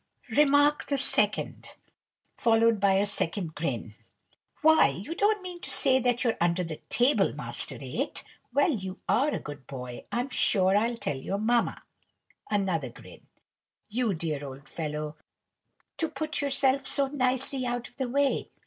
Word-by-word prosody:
Remark 290 0 +4
the 280 - 0
second, 270 - +1 0.7
followed 230 -1 +3
by 195 -1 +4
a 195 +1 +3
second 175 -4 -1
grin. 125 -9 -3 0.7
"Why, 315 - +7
you 185 - -5
don't 410 +2 +1
mean 355 -1 -7
to - - -2
say 260 -2 +4
that 245 -1 +1
you're 235 -3 +1
under 175 +1 +2
the 160 -2 -5
table, 245 +5 +3
Master - - -4
No. - - -9
8? - - -3 0.3
Well 285 +6 +3
you 190 -7 -4
are 275 +5 +3
a - - -1
good 145 -3 -9
boy! 125 -3 -7
I'm 245 +3 -1
sure 190 -6 +3
I'll 230 +3 +1
tell 145 -11 -3
your 190 +9 -3
mamma." 235 +3 +1 0.7
Another 185 -10 0
grin. - - -15 0.6
"You 225 -3 0
dear 155 -3 -3
old 135 0 -9
fellow, 150 -1 -4 0.8
to 325 - 0
put 310 0 -3
yourself 275 -1 +2
so 280 - +2
nicely 260 -1 -1
out 245 0 -3
of - - -22
the 260 -3 -2
way! 280 +2 +1
230 Hz, 160 wpm, -28 LUFS, 165-275 Hz, 0.8 s, Why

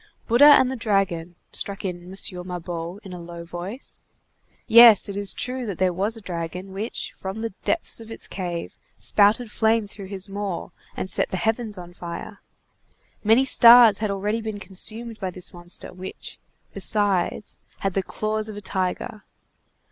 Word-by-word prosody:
"Bouddha 285 +5 +8
and 260 0 +2
the - - -3
Dragon," 195 -7 -1 0.2
struck 200 0 -2
in 180 -2 -4
M. 185 +2 -10 0.3
Mabeuf 175 0 -5
in 190 -3 -9
a 175 - -7
low 170 0 -9
voice. 175 +9 -6 0.6
"Yes, 230 -2 +8
it 200 - -6
is 200 -1 +1
true 255 0 -3
that 195 -5 -4
there 185 -1 +2
was 205 +6 -1
a - - -11
dragon, 180 +1 -6
which, 210 +4 -4
from 195 +3 -6
the 230 -3 -4
depths 335 - -1
of 225 -1 -11
its 225 - -2
cave, 175 -3 -5 0.2
spouted 215 +3 +3
flame 220 0 +2
through 200 -1 -9
his 195 0 -3
maw 200 -2 -4 0.3
and - - -3
set - - 0
the 185 - -3
heavens 220 +2 -1
on 175 -1 -10
fire. 175 +4 -7 0.8
Many 225 +5 +5
stars 235 -5 +8
had 215 -1 -1
already 205 +3 -1
been 220 -2 -5
consumed 220 +4 -4
by 190 - -2
this 180 +1 -7
monster, 175 0 -5
which, 185 +1 -8 0.3
besides, 200 -1 0 0.2
had 195 -1 -1
the 195 - +1
claws 215 +3 -2
of 210 - -7
a - - -4
tiger. 190 +2 -3
200 Hz, 170 wpm, -24 LUFS, 180-220 Hz, 0.8 s, Bouddha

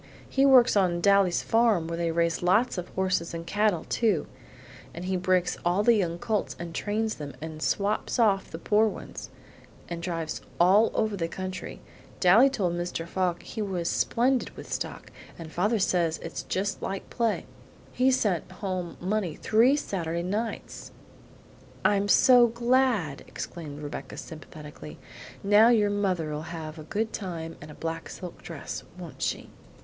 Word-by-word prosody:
He 270 +1 +3
works 255 -3 +6
on 180 -4 +2
Daly's 195 -2 +3
farm 225 -7 +3
where 165 - -3
they 170 0 -1
raise 170 0 0
lots 195 +4 +2
of 180 - -7
horses 185 -3 -1
and 165 0 -6
cattle, 205 -2 +1
too, 210 -10 +1 0.7
and 175 +2 -6
he 190 0 -1
breaks 180 0 +1
all 180 +4 +2
the 235 - +6
young 175 -6 0
colts 215 +1 -2
and 170 -1 -7
trains 215 +4 -1
them, 145 -3 -8
and 155 0 -7
swaps 205 +5 0
off 205 -5 +2
the - - -6
poor 210 +5 +3
ones, - - -7 0.6
and 170 -1 -5
drives 165 -2 -3 0.2
all 195 +6 +6
over 215 -1 +1
the 165 -4 -2
country. 185 +2 -6 0.4
Daly 215 +9 +6
told 190 -10 -1
Mr. 175 -1 -3
Fogg 180 -1 -1
he 220 - -6
was 185 -4 -2
splendid 250 +6 +1
with - - -7
stock, - - -5 0.3
and 165 -2 -9
father 205 +7 +1
says 175 -4 +1
it's - - -5
just 200 +2 -2
like 195 0 -4
play. 230 -3 0 0.5
He's 260 +1 +3
sent 185 -6 -1
home 185 -4 -4
money 185 -3 -1
three 235 +6 +4
Saturday 170 - -2
nights." 210 +5 -4 0.9
"I'm 200 0 +3
so 245 +2 +7
glad!" 235 - +1
exclaimed 150 -4 -7
Rebecca 145 -2 -7
sympathetically. 150 - -10 0.5
"Now 205 +3 +6
your 210 -4 +3
mother'll 180 -7 -1
have 160 -1 -7
a - - -7
good 220 +7 -2
time 165 -5 -5
and 150 - -10
a 150 - -10
black 165 0 -5
silk 180 -2 -9
dress, 165 -4 -6
won't 175 -3 -10
she?" - - -2
185 Hz, 160 wpm, -27 LUFS, 170-215 Hz, 0.9 s, so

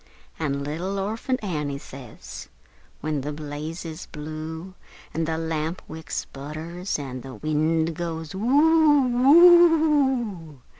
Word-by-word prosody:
An' 140 -3 -1
little 170 +7 -3
Orphant 220 +5 -2
Annie 150 -7 -2
says, 130 -4 -10 0.5
when 150 -1 -2
the 145 +3 -4
blaze 150 +3 -6
is 160 +1 -7
blue, 155 +4 -7 0.4
An' 165 0 -1
the 160 0 -2
lamp 160 +1 -2
wick 160 +1 -10
sputters, 160 +6 -4
an' 130 -3 -6
the 130 -1 -9
wind 160 +5 0
goes 165 -2 -5
woo 275 +2 +4 1.3
oo! 130 - -23
160 Hz, 115 wpm, -24 LUFS, 150-185 Hz, 1.3 s, woo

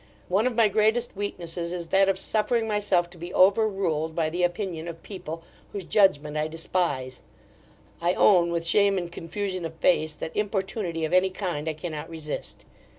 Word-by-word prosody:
One 200 +6 +3
of 250 - -2
my 225 -2 +5
greatest 220 +3 +1
weaknesses 175 -3 -4
is 170 -2 -5
that 195 0 +4
of 195 - +1
suffering 225 +3 +1
myself 205 -5 +1
to 175 - -14
be 175 +2 -6
over 200 +4 +5
ruled 160 -6 -1
by 160 -2 0
the 175 +2 -2
opinion 175 -2 -1
of 165 -1 -8
people, 165 -5 -7 0.3
whose 195 -3 -5
judgment 155 -8 +3
I 150 0 0
despise 155 -6 -2 0.8
I 175 +1 +2
own, 175 -4 +5
with 170 -1 -1
shame 200 +2 +3
and 175 -2 -3
confusion 185 +2 -4
of 165 0 -5
face, 160 -2 +2
that 160 - -6
importunity 195 -5 -1
of 155 - -4
any 185 +1 +4
kind 175 -5 -3
I - - -1
cannot 155 0 -6
resist. 155 -2 -6
175 Hz, 180 wpm, -26 LUFS, 165-200 Hz, 0.8 s, my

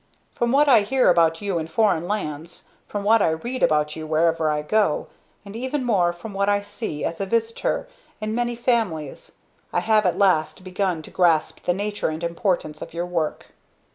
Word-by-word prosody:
"From 235 0 0
what 290 +3 +4
I 245 -6 +7
hear 250 0 +3
about 165 -1 +3
you 195 -4 -1
in 160 - -4
foreign 175 -2 +1
lands; 170 -5 -4 0.2
from 205 -1 -4
what 220 +2 +4
I - - +3
read 240 +11 -3
about 150 -1 +2
you 155 -1 -6
wherever 160 0 +2
I 150 0 -1
go; 205 -1 +1 0.4
and, 200 +1 -10
even 260 +4 -2
more, 190 -8 +2
from 175 +5 -9
what 200 +1 +1
I 205 0 +1
see, 200 -7 -5
as 165 +3 -3
a 195 - -2
visitor, 230 +2 -1 0.3
in 215 -1 -3
many 240 +1 -1
families; 220 - -2 0.4
I 175 - +1
have 215 0 +3
at 175 - 0
last 185 -3 +2
begun 185 -3 -2
to - - -12
grasp 165 -4 +1
the 175 - +2
nature 205 -1 -2
and 155 +2 -5
importance 170 -3 -1
of - - -8
your 170 +1 -2
work. 170 -3 -3
185 Hz, 195 wpm, -23 LUFS, 160-220 Hz, 0.4 s, I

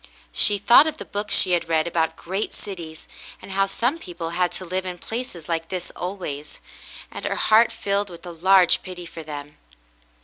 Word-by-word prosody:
She 205 - +3
thought 240 +9 +7
of 315 - -3
the - - -7
books 205 0 -2
she 185 - +3
had 175 -1 +1
read 160 -1 +2
about 165 -1 0
great 190 +6 -4
cities, 170 -5 -8 0.3
and - - -11
how 195 +1 +2
some 245 +10 0
people 170 - -6
had 180 0 +1
to 185 - -4
live 185 +2 -2
in 180 -1 -5
places 220 -5 -6
like 165 -1 -2
this 180 -2 -4
always; 175 -6 -6 0.5
and - - -7
her - - -1
heart 225 +2 +5
filled 205 -3 -1
with 175 0 -11
a 175 - -6
large 185 +2 +5
pity 180 -2 -8
for 165 -1 -8
them. 145 -1 -8
180 Hz, 195 wpm, -24 LUFS, 165-200 Hz, 0.5 s, thought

